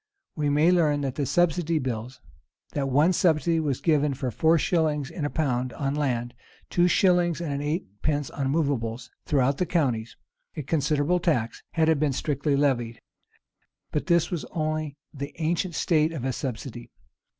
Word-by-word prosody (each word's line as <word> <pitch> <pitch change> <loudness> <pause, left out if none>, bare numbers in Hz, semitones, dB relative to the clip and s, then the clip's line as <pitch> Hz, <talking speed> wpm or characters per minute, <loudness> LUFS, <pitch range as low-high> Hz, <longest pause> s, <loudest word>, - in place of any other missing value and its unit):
We 150 -2 0
may 150 +4 +4
learn 150 -5 +2
from 135 - -1
the 140 +1 -3
subsidy 170 0 +2
bills,[v] 125 -2 -4 0.5
that 135 -1 -1
one 150 +7 +4
subsidy 165 -2 +2
was 145 -5 -1
given 150 -4 +2
for 130 -2 -3
four 160 +9 +3
shillings 150 -4 0
in 155 - -4
the - - 0
pound 130 -6 -1
on 140 -1 -2
land, 125 -5 -1
and - - -29
two 175 0 +4
shillings 175 -3 +3
and 145 -4 -3
eightpence 145 - -2
on 135 -2 -2
movables 130 -6 -1 0.2
throughout 140 -1 +2
the 180 - 0
counties; 125 -9 -1 0.4
a 150 - -3
considerable 150 +4 +1
tax, 135 -10 0
had 160 -1 +2
it 160 -3 +3
been 145 -2 +1
strictly 140 +1 0
levied. 120 -5 0 0.9
But 150 - -2
this 170 -2 +3
was 170 -4 -2
only 155 -2 -3 0.2
the 140 0 -6
ancient 170 +2 -1
state 155 -1 +2
of 135 -6 -4
a 130 - 0
subsidy. 120 -2 -6
145 Hz, 165 wpm, -26 LUFS, 135-160 Hz, 0.9 s, may